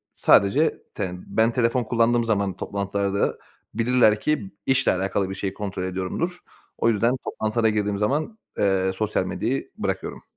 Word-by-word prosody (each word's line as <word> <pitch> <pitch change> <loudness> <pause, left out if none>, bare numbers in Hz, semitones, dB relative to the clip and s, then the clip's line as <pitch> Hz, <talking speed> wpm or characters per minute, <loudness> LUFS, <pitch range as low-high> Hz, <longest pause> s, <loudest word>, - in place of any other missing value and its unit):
sadece 130 +11 +4
ten 90 -1 -4
ben 110 +1 +2
telefon 120 0 +1
kullandığım 120 +1 +2
zaman 100 -4 0
toplantılarda 100 0 -1 0.4
bilirler 115 -2 +3
ki 120 -11 -1
işle 135 0 +3
alakalı 95 +1 -1
bir 95 - -4
şey 95 0 -3
kontrol 95 -3 -4
ediyorumdur. 95 - -3 0.4
O 115 - +2
yüzden 115 +3 +2
toplantılara 110 +1 0
girdiğim 105 -1 -1
zaman, 150 - -1 0.2
eee, 95 -1 +2
sosyal 110 +2 0
medyayı - - -2
bırakıyorum. - - -3
105 Hz, 140 wpm, -24 LUFS, 100-120 Hz, 0.4 s, sadece